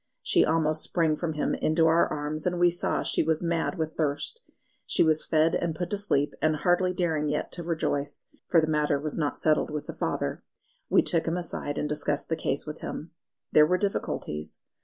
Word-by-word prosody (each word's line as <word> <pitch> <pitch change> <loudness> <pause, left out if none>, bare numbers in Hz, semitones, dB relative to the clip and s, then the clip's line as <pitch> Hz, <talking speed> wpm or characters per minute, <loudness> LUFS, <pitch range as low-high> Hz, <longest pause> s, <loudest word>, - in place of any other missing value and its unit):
She - - +4
almost 155 -1 +1
sprang 165 -3 +1
from 160 0 -3
him 150 - -1
into 160 +1 +2
our 165 +1 +4
arms, 150 +2 -3
and 180 -1 -1
we 175 0 +5
saw 175 - -1
she - - 0
was 160 0 +1
mad 170 +2 -1
with 160 -1 -3
thirst. 155 - -1 0.5
She - - +3
was 155 -1 +2
fed 160 +1 +2
and 165 -2 -1
put 175 +1 -4
to 205 - +1
sleep, 150 -8 0
and 155 0 +2
hardly 175 +4 +2
daring 160 -4 0
yet 150 - -2
to 175 - -5
rejoice 155 -4 -2 0.2
(for 170 - +5
the 160 - +2
matter 150 -2 +1
was 150 +1 -2
not 150 -3 -1
settled 155 -1 +2
with 150 -1 -4
the - - -6
father), - - -2 0.5
we - - +5
took 165 -1 +2
him 165 +2 0
aside 155 -4 -4
and 150 - -1
discussed 150 -1 -2
the 160 - +1
case 140 -2 -1
with 150 0 -7
him. 160 - -6 0.4
There 150 0 +6
were 180 +2 +2
difficulties. 80 - -3
155 Hz, 205 wpm, -27 LUFS, 150-170 Hz, 0.5 s, There